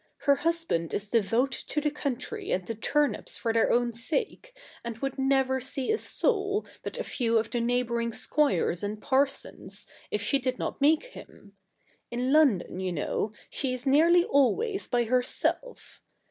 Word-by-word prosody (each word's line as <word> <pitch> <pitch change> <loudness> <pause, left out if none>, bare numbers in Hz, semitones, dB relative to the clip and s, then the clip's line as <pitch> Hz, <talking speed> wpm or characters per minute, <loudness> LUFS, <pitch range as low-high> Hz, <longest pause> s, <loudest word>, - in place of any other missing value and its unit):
Her 280 -1 +4
husband 330 - 0
is 205 - -2
devoted 230 +5 0
to 300 - 0
the 300 0 0
country 295 - -4
and 185 - 0
the 230 - -3
turnips 290 +6 0
for 230 -2 -1
their 225 - +3
own 240 0 +2
sake, 430 - -3 0.3
and 235 -1 -5
would 270 +3 -4
never 265 -1 +2
see 270 +1 -2
a 440 - +1
soul 410 -3 0 0.2
but - - -6
a - - -2
few 230 -3 0
of 220 0 -1
the 240 - 0
neighbour 240 0 0
ing 230 0 -2
squires 220 - +1
and 210 +1 -4
parsons, 275 +4 -1 0.2
if - - -1
she 275 - +2
did 255 -1 -2
not - - -4
make 305 +3 +4
him. 205 - -14 0.5
In 250 +3 -1
London, 260 - +3
you 185 -1 -2
know, 175 +6 -2 0.2
she 255 -2 -1
is 255 - -9
nearly 330 +6 +5
always 390 - +1
by 240 -1 +1
herself. 250 - -2
265 Hz, 170 wpm, -28 LUFS, 230-300 Hz, 0.5 s, nearly